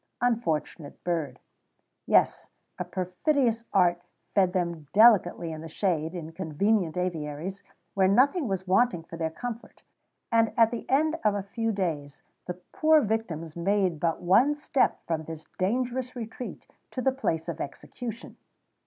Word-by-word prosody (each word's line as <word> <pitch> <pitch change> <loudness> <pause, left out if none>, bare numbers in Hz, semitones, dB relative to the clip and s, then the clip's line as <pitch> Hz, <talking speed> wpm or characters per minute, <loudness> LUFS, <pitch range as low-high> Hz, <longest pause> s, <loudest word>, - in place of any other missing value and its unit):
Unfortunate 170 -10 -1
bird! 160 -7 -2 0.7
Yes, - - +3 0.3
a - - 0
perfidious 225 - 0
art 175 -3 +3 0.3
fed 190 -2 +4
them 170 -5 -2
delicately 195 -6 +5
in 155 -1 -6
the 165 - -7
shade, 165 -1 -1
in 165 -2 -6
convenient 180 +2 0
aviaries, 175 +1 -3 0.3
where 190 -1 +3
nothing 270 - +3
was 190 -2 -2
wanting 195 -2 +3
for 165 - -10
their 165 -1 -1
comfort, 230 +8 -7 0.5
and 225 -1 +3
at 230 -1 +5
the 235 - -6
end 315 +4 +2
of 210 -1 +3
a 200 - -2
few 225 +3 -2
days 155 -8 -3 0.2
the 180 - -3 0.2
poor 310 0 +5
victims 180 - -2
made 185 -1 +1
but 165 +1 -1
one 240 +12 +4
step 290 -2 +1
from 160 -2 -2
this 160 0 -8
dangerous 250 +6 -1
retreat 235 +1 -7 0.2
to - - -6
the 265 +1 +2
place 165 -12 -2
of 170 - -4
execution. 230 - -7
190 Hz, 145 wpm, -27 LUFS, 165-230 Hz, 0.7 s, delicately